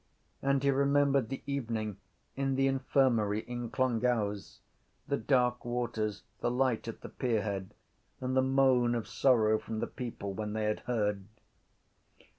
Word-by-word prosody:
And 140 Hz, 0 st, +1 dB
he 140 Hz, -, +4 dB
remembered 140 Hz, -2 st, +3 dB
the 135 Hz, -, -5 dB
evening 115 Hz, -7 st, -2 dB, 0.4 s
in 135 Hz, 0 st, 0 dB
the 135 Hz, 0 st, +2 dB
infirmary 130 Hz, -6 st, +2 dB
in 120 Hz, 0 st, -5 dB
Clongowes, 115 Hz, -5 st, 0 dB, 0.5 s
the 140 Hz, -, +1 dB
dark 125 Hz, -3 st, +2 dB
waters, 115 Hz, -4 st, -2 dB, 0.2 s
the -, -, 0 dB
light 125 Hz, -2 st, +1 dB
at 115 Hz, -, -6 dB
the -, -, -8 dB
pierhead 105 Hz, -6 st, -2 dB, 0.4 s
and 130 Hz, 0 st, -2 dB
the 130 Hz, -, +5 dB
moan 130 Hz, -2 st, +3 dB
of 115 Hz, -, -3 dB
sorrow 110 Hz, -5 st, +3 dB
from 110 Hz, -, -5 dB
the -, -, 0 dB
people 115 Hz, -5 st, -6 dB
when 105 Hz, +1 st, -4 dB
they 110 Hz, 0 st, -1 dB
had 105 Hz, 0 st, 0 dB
heard. 105 Hz, -5 st, -1 dB
120 Hz, 145 wpm, -31 LUFS, 110-135 Hz, 0.5 s, the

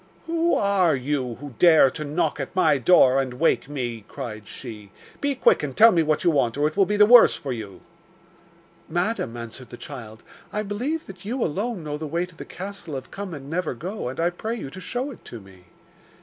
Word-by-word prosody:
'Who 335 Hz, +1 st, +1 dB
are 195 Hz, -6 st, +3 dB
you 130 Hz, -2 st, -2 dB
who 145 Hz, 0 st, -10 dB
dare 160 Hz, -6 st, +6 dB
to 155 Hz, -, -5 dB
knock 150 Hz, +1 st, -1 dB
at 135 Hz, +6 st, -5 dB
my 155 Hz, -6 st, +3 dB
door 135 Hz, -2 st, +5 dB
and 130 Hz, -2 st, -5 dB
wake 150 Hz, -1 st, +1 dB
me?' 120 Hz, -6 st, -4 dB
cried 110 Hz, -6 st, -7 dB
she. 110 Hz, -5 st, -9 dB, 0.3 s
'Be 285 Hz, -1 st, 0 dB
quick -, -, +4 dB
and 145 Hz, -3 st, -5 dB
tell 225 Hz, +1 st, +8 dB
me 170 Hz, -, +3 dB
what 155 Hz, -1 st, 0 dB
you 175 Hz, -, +4 dB
want, 135 Hz, -5 st, +1 dB
or 145 Hz, +1 st, +2 dB
it 155 Hz, -, -5 dB
will 195 Hz, -2 st, +3 dB
be 210 Hz, -, 0 dB
the 210 Hz, -, +7 dB
worse 240 Hz, +2 st, +8 dB
for 135 Hz, -3 st, -4 dB
you.' 105 Hz, -5 st, -8 dB, 1.1 s
'Madam,' 175 Hz, -, -1 dB
answered 115 Hz, +2 st, -9 dB
the 120 Hz, -, -10 dB
child, 115 Hz, -6 st, -9 dB, 0.3 s
'I 210 Hz, -, -2 dB
believe 250 Hz, +11 st, -3 dB
that 190 Hz, -2 st, -12 dB
you 235 Hz, +4 st, -2 dB
alone 195 Hz, +3 st, -2 dB
know 150 Hz, -1 st, -4 dB
the 155 Hz, -, -4 dB
way 170 Hz, +4 st, -1 dB
to 180 Hz, -2 st, -19 dB
the -, -, -9 dB
castle 185 Hz, -5 st, -7 dB
of 130 Hz, -1 st, -7 dB
Come 200 Hz, -1 st, -6 dB
and 140 Hz, -1 st, -10 dB
never 165 Hz, -2 st, -2 dB
go, 185 Hz, -, -5 dB
and 130 Hz, -, -8 dB
I 170 Hz, +1 st, +2 dB
pray 220 Hz, +6 st, -4 dB
you 140 Hz, -, -7 dB
to 185 Hz, -, -9 dB
show 255 Hz, +7 st, -3 dB
it 245 Hz, -, -13 dB
to 120 Hz, -, -8 dB
me. 95 Hz, -3 st, -17 dB
155 Hz, 220 wpm, -24 LUFS, 130-200 Hz, 1.1 s, tell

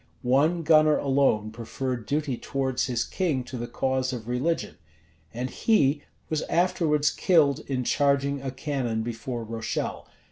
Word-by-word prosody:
One 150 Hz, +7 st, +2 dB
gunner 155 Hz, -1 st, +5 dB
alone 135 Hz, -6 st, +2 dB
preferred 120 Hz, +1 st, -4 dB
duty 145 Hz, -2 st, -1 dB
towards 130 Hz, +1 st, -1 dB
his 120 Hz, -3 st, 0 dB
king 155 Hz, -9 st, -1 dB
to 125 Hz, +1 st, -8 dB
the 120 Hz, -1 st, -4 dB
cause 130 Hz, +1 st, -1 dB
of 120 Hz, -3 st, -6 dB
religion; 130 Hz, +8 st, -1 dB, 0.5 s
and 125 Hz, +2 st, -3 dB
he 145 Hz, -, +2 dB, 0.3 s
was 155 Hz, -1 st, -1 dB
afterwards 165 Hz, -4 st, +2 dB
killed 155 Hz, -7 st, +3 dB
in 130 Hz, -2 st, -1 dB
charging 140 Hz, +1 st, +1 dB
a 135 Hz, -, -3 dB
cannon 130 Hz, -5 st, -2 dB
before 120 Hz, +1 st, -4 dB
Rochelle. 115 Hz, 0 st, -4 dB
135 Hz, 140 wpm, -26 LUFS, 125-150 Hz, 0.5 s, gunner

